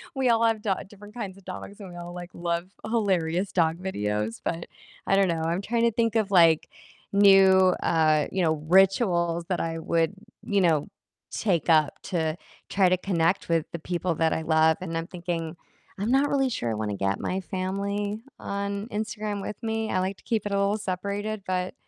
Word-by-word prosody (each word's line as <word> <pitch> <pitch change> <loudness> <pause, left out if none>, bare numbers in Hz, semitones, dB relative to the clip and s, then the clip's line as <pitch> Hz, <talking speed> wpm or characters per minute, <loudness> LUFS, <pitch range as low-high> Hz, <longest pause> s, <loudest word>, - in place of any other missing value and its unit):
we 265 -2 +1
all 230 -1 +3
have 225 -2 +1
do 205 -2 +1
different 205 +1 -14
kinds 200 -5 -5
of 195 - -17
dogs, 195 +3 -8
and 195 - -8
we 175 - -10
all, 175 0 -7
like, 175 0 -7
love 170 +1 -2 0.2
hilarious 190 -5 0
dog 165 -2 +2
videos- 105 - -2
but 170 0 -3 0.4
I 195 - +3
don't 195 - +4
know, 165 -2 -1
I'm 170 +3 0
trying 230 +3 0
to 235 - +4
think 230 0 0
of 215 -3 +1
like 165 -4 +5 0.4
new, 195 -2 +6
uh, 155 -2 +3
you 190 - 0
know, 160 -2 +3 0.2
rituals 180 -3 +3
that 180 - 0
I 165 0 -2
would, 165 +2 0 0.3
you 200 -2 +2
know, 160 -3 +2 0.4
take 175 -6 0
up 155 -3 +3
to 160 -3 -1 0.3
try 195 -2 +3
to 185 +1 +3
connect 180 -1 0
with 165 -2 +2
the 170 - -4
people 175 +1 -2
that 160 0 +2
I 160 - -1
love, 160 0 +3
and 165 -3 -4
I'm 165 0 -3
thinking 170 -2 -4 0.4
I'm 205 +4 -1
not 270 +2 +4
really 270 -2 +2
sure 120 - -2
I - - 0
wanna 105 -2 -3
get 100 0 0
my 185 - -1
family 200 +3 -3 0.2
on 200 +1 -4
Instagram 210 -1 -3
with 200 +1 -6
me; 220 -1 -1
I 185 - +1
like 190 +1 -2
to - - -22
keep 220 -3 -1
it 205 - -3
a 200 - +1
little 200 +1 +1
separated. 200 +2 -3
But 185 0 -1
185 Hz, 200 wpm, -26 LUFS, 165-205 Hz, 0.4 s, new